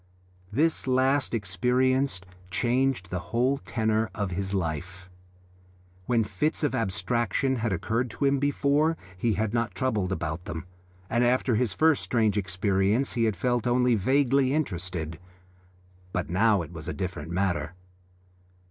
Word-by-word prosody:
This 155 Hz, +5 st, +1 dB
last 130 Hz, +2 st, +2 dB
experience 125 Hz, +2 st, +1 dB, 0.3 s
changed 125 Hz, -4 st, 0 dB
the 90 Hz, -, -1 dB
whole 130 Hz, +4 st, +1 dB
tenor 110 Hz, -3 st, 0 dB
of 100 Hz, -3 st, -2 dB
his 95 Hz, +2 st, -3 dB
life. 90 Hz, 0 st, -4 dB, 1.0 s
When 115 Hz, -2 st, +3 dB
fits 150 Hz, +10 st, -1 dB
of 150 Hz, -, +1 dB
abstraction 115 Hz, +6 st, 0 dB
had 115 Hz, -1 st, -1 dB
occurred 115 Hz, +7 st, -1 dB
to 125 Hz, +6 st, -2 dB
him 140 Hz, 0 st, +3 dB
before 145 Hz, +3 st, +2 dB, 0.2 s
he 110 Hz, +4 st, 0 dB
had 110 Hz, +2 st, -1 dB
not 115 Hz, 0 st, -1 dB
troubled 110 Hz, -8 st, 0 dB
about 85 Hz, -1 st, -3 dB
them, 85 Hz, -4 st, -5 dB, 0.4 s
and 120 Hz, +4 st, +1 dB
after 125 Hz, +1 st, +2 dB
his 115 Hz, -2 st, +1 dB
first 160 Hz, +6 st, +3 dB
strange 110 Hz, -4 st, +1 dB
experience 100 Hz, +4 st, +1 dB
he 115 Hz, -1 st, +1 dB
had 110 Hz, -3 st, +1 dB
felt 120 Hz, +5 st, 0 dB
only 125 Hz, 0 st, +3 dB
vaguely 135 Hz, +4 st, +2 dB
interested; 90 Hz, -, -3 dB, 0.9 s
but 90 Hz, -2 st, -2 dB
now 100 Hz, 0 st, +3 dB
it 80 Hz, +2 st, -11 dB
was 80 Hz, -2 st, -8 dB
a -, -, -2 dB
different 90 Hz, -5 st, -4 dB
matter. 90 Hz, -1 st, -1 dB
110 Hz, 140 wpm, -27 LUFS, 95-130 Hz, 1.0 s, When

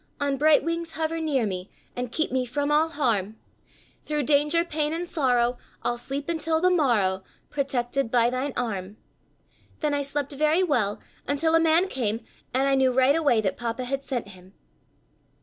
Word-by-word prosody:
On 285 Hz, -1 st, 0 dB
bright 300 Hz, +2 st, +4 dB
wings 335 Hz, 0 st, -3 dB
hover 320 Hz, +1 st, -2 dB
near 290 Hz, -7 st, +1 dB
me, 185 Hz, -1 st, -4 dB, 0.3 s
And 245 Hz, -1 st, -4 dB
keep 315 Hz, 0 st, -1 dB
me 260 Hz, 0 st, +1 dB
from 285 Hz, +4 st, -2 dB
all 310 Hz, +2 st, +3 dB
harm! 220 Hz, -, -1 dB, 0.6 s
Thru 300 Hz, -1 st, -2 dB
danger, 300 Hz, +4 st, +2 dB
pain 305 Hz, -2 st, -1 dB
and 345 Hz, +2 st, -3 dB
sorrow 245 Hz, -6 st, +1 dB, 0.2 s
I'll 240 Hz, -, -1 dB
sleep 275 Hz, +3 st, -5 dB
until 325 Hz, -1 st, 0 dB
the 365 Hz, +2 st, +3 dB
morrow, 215 Hz, -, +2 dB, 0.3 s
Protected 275 Hz, -2 st, -1 dB
by 240 Hz, 0 st, +3 dB
thine 260 Hz, +2 st, -2 dB
arm. 205 Hz, -4 st, -3 dB, 0.8 s
"Then 300 Hz, -2 st, +1 dB
I 285 Hz, -, +1 dB
slept 280 Hz, 0 st, -2 dB
very 305 Hz, +5 st, +2 dB
well, 235 Hz, -, 0 dB, 0.3 s
until 315 Hz, +3 st, +1 dB
a 330 Hz, -, +6 dB
man 330 Hz, +3 st, +3 dB
came, 225 Hz, -, -2 dB, 0.3 s
and 265 Hz, +2 st, +1 dB
I 275 Hz, -, +3 dB
knew 265 Hz, -1 st, +3 dB
right 260 Hz, +3 st, +4 dB
away 285 Hz, -9 st, +3 dB
that 195 Hz, -3 st, -1 dB
Papa 240 Hz, +2 st, -3 dB
had 275 Hz, +2 st, -2 dB
sent 250 Hz, -7 st, -4 dB
him." 185 Hz, 0 st, -15 dB
275 Hz, 175 wpm, -25 LUFS, 240-310 Hz, 0.8 s, a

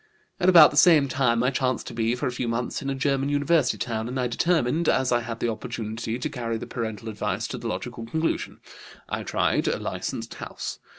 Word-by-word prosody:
"At 180 Hz, -, +4 dB
about 165 Hz, -4 st, +9 dB
the 145 Hz, -, -5 dB
same 155 Hz, -4 st, +6 dB
time 125 Hz, -3 st, +1 dB
I 130 Hz, -, +2 dB
chanced 130 Hz, -1 st, -1 dB
to -, -, -7 dB
be, 115 Hz, +1 st, 0 dB
for 125 Hz, -, -3 dB
a 130 Hz, -, 0 dB
few 125 Hz, 0 st, -3 dB
months, 115 Hz, +4 st, -2 dB
in 140 Hz, -, -3 dB
a 135 Hz, -, -1 dB
German 140 Hz, 0 st, 0 dB
university 145 Hz, -2 st, +2 dB
town, 110 Hz, -2 st, -3 dB
and 130 Hz, +2 st, -3 dB
I 125 Hz, -, +1 dB
determined, 155 Hz, +4 st, +1 dB
as 130 Hz, -1 st, +2 dB
I 120 Hz, 0 st, +3 dB
had 115 Hz, 0 st, -6 dB
the 120 Hz, -, 0 dB
opportunity, 110 Hz, 0 st, -4 dB
to 125 Hz, -, -2 dB
carry 115 Hz, -2 st, -3 dB
the -, -, -6 dB
parental 110 Hz, -3 st, -5 dB
advice 105 Hz, -1 st, -2 dB
to -, -, -5 dB
the 115 Hz, -, -5 dB
logical 115 Hz, +1 st, -5 dB
conclusion. 160 Hz, +6 st, -2 dB, 0.5 s
I -, -, -3 dB
tried -, -, 0 dB
a -, -, +1 dB
licensed -, -, -4 dB
house. -, -, -6 dB
125 Hz, 220 wpm, -25 LUFS, 115-140 Hz, 0.5 s, about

